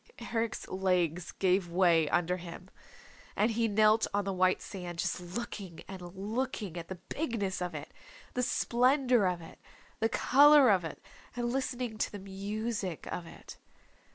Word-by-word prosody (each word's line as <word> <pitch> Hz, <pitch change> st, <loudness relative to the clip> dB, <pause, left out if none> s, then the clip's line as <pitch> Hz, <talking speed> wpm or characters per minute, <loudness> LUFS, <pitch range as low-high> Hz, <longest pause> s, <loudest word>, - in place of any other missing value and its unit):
Eric's 225 Hz, -1 st, -1 dB
legs 180 Hz, -3 st, 0 dB
gave 185 Hz, -1 st, +1 dB
way 170 Hz, -3 st, +3 dB
under 175 Hz, +1 st, +1 dB
him, 180 Hz, +1 st, -10 dB, 0.6 s
and 215 Hz, +3 st, +2 dB
he 230 Hz, 0 st, +1 dB
knelt 215 Hz, +1 st, +4 dB
on 205 Hz, -1 st, +1 dB
the 195 Hz, -, -1 dB
white 185 Hz, 0 st, +3 dB
sand, 180 Hz, -3 st, -7 dB
just 170 Hz, -, -1 dB
looking 185 Hz, -1 st, -6 dB
and 190 Hz, -1 st, -8 dB
looking 210 Hz, -2 st, -3 dB
at 170 Hz, -1 st, -6 dB
the 190 Hz, -, -5 dB
bigness 205 Hz, -, -3 dB
of 180 Hz, -2 st, -3 dB
it, 150 Hz, +1 st, -7 dB, 0.4 s
the 250 Hz, -, 0 dB
splendor 250 Hz, -2 st, +3 dB
of 180 Hz, -1 st, -1 dB
it, -, -, -13 dB, 0.4 s
the 225 Hz, -, +2 dB
color 285 Hz, -1 st, +6 dB
of 185 Hz, -3 st, +3 dB
it, 160 Hz, -, -8 dB, 0.3 s
and 240 Hz, 0 st, -1 dB
listening 250 Hz, -4 st, -2 dB
to -, -, 0 dB
the 205 Hz, -, -6 dB
music 200 Hz, -1 st, -4 dB
of 170 Hz, -, -5 dB
it. -, -, -12 dB
195 Hz, 155 wpm, -31 LUFS, 180-230 Hz, 0.6 s, color